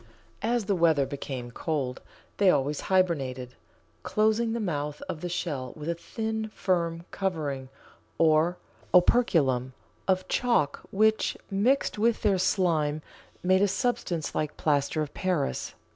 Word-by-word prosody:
As 235 -1 0
the 200 - +1
weather 160 -5 +3
became 130 -3 -6
cold 135 -2 -3 0.4
they 200 -2 +5
always 145 -2 +1
hibernated, 135 -10 +1 0.5
closing 220 - +1
the 235 - -1
mouth 150 -7 -2
of 155 - -5
the 180 - -3
shell 150 -8 -3
with 150 0 -7
a 170 - +1
thin, 220 +5 -4
firm 170 -2 0
covering, 150 -9 -2 0.5
or 160 +2 +3 0.4
operculum, 150 - +3 0.3
of 185 -1 +1
chalk, 235 - +1
which, 215 +2 +2
mixed 215 +4 +1
with 230 +1 +2
their 200 -3 +3
slime, 160 -5 +1 0.4
made 185 +1 +4
a 205 - +5
substance 195 - -1
like 150 -1 -2
plaster 150 +1 +1
of 145 - -8
Paris. 180 -7 -1
170 Hz, 130 wpm, -27 LUFS, 145-200 Hz, 0.5 s, they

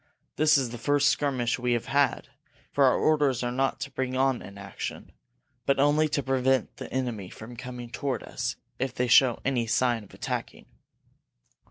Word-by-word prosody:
This 155 0 +5
is 130 -4 -1
the 120 - -7
first 145 +2 +3
skirmish 130 -5 0
we 125 0 +1
have 120 - -1
had, 140 0 +1 0.4
for 140 - +4
our 130 - +4
orders 145 -5 +2
are 120 - -1
not 135 +2 0
to 140 - -4
bring 130 -1 -2
on 135 -1 +2
an 100 - -11
action, 100 -1 -7 0.6
but 135 0 +3
only 150 +2 +3
to 145 -1 -1
prevent 130 0 +1
the - - -8
enemy 120 -8 -3
from 115 +2 -10
coming 120 0 -8
toward 140 0 -2
us - - -3 0.2
if 130 -1 -2
they 125 - 0
show 120 0 +5
any 125 -3 0
sign 120 -1 +1
of 100 - -17
attacking." - - -5
130 Hz, 180 wpm, -27 LUFS, 120-140 Hz, 0.6 s, This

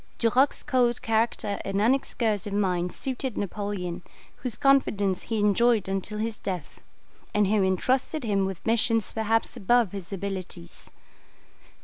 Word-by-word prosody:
Duroc's 250 +4 +2
cold 245 -4 +2
character 220 -2 0
and 195 0 -1
unexcursive 220 -3 +1
mind 180 -3 0
suited 260 -3 -3
Napoleon, 195 -3 -3 0.4
whose 245 -4 -5
confidence 205 -9 +2
he 225 - -3
enjoyed 210 0 +3
until 195 +2 -3
his 220 0 -3
death, 180 -6 -5 0.5
and 210 0 +4
who 205 +1 +2
entrusted 255 - 0
him 200 -4 +1
with 190 -2 -7
missions 225 -1 +2
perhaps 225 0 0
above 235 0 +2
his 195 -2 -7
abilities. 190 - -6
210 Hz, 125 wpm, -26 LUFS, 195-235 Hz, 0.5 s, and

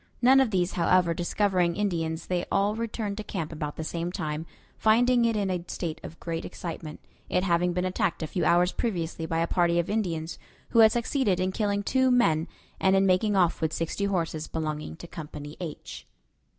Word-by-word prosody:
None 260 +3 +6
of 265 -3 +3
these, 185 -3 +1
however, 180 0 +3
discovering 180 0 +1
Indians, 165 -5 -1
they 180 -1 -1
all 200 +1 +2
returned 220 -3 -3
to 215 - -4
camp 170 -6 -4
about 150 -2 -4
the 160 - -4
same 170 +2 -3
time, 155 -1 -4 0.3
finding 240 +2 +4
it 230 -1 +1
in 200 -2 0
a 180 -2 -2
state 165 -2 -4
of 165 - -10
great 165 -1 -4
excitement, 165 -3 -7 0.3
it 180 - +1
having 175 -1 +2
been 180 +1 -1
attacked 185 -2 -1
a - - 0
few 170 +3 -2
hours 175 +3 +4
previously 170 -7 -2
by 165 - -1
a - - +2
party 170 0 +2
of 170 +3 0
Indians, 170 -7 -2 0.3
who 230 - +3
had 220 -1 +8
succeeded 235 -5 +1
in 185 +1 0
killing 205 0 -1
two 260 +4 +2
men 165 -11 +3 0.3
and 190 0 +3
in 195 0 +4
making 195 +3 +2
off 175 -4 +2
with 160 -1 +1
sixty 165 +4 -2
horses 165 -5 -1
belonging 155 -1 -4
to 170 - -10
Company 150 -2 -8
H. 170 -4 -7
180 Hz, 195 wpm, -27 LUFS, 165-205 Hz, 0.3 s, had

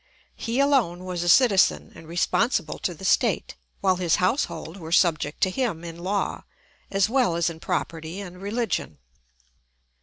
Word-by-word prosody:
He 235 +2 -2
alone 240 -11 +2
was 180 -2 -3
a 175 - 0
citizen 205 -2 +4
and 160 - -13
responsible 175 +8 0
to - - -2
the - - -9
state, - - +1 0.3
while 185 -2 +2
his 175 -3 +2
household 185 - -1
were 165 -3 -8
subject 165 -4 +2
to 185 - +3
him 205 -7 -2
in 170 0 -8
law, 195 +3 -2 0.5
as 195 0 +2
well 240 -7 +2
as 170 +1 +1
in 160 - -11
property 165 +3 -3
and 180 -2 -9
religion. 205 - -2
185 Hz, 155 wpm, -25 LUFS, 170-215 Hz, 0.5 s, citizen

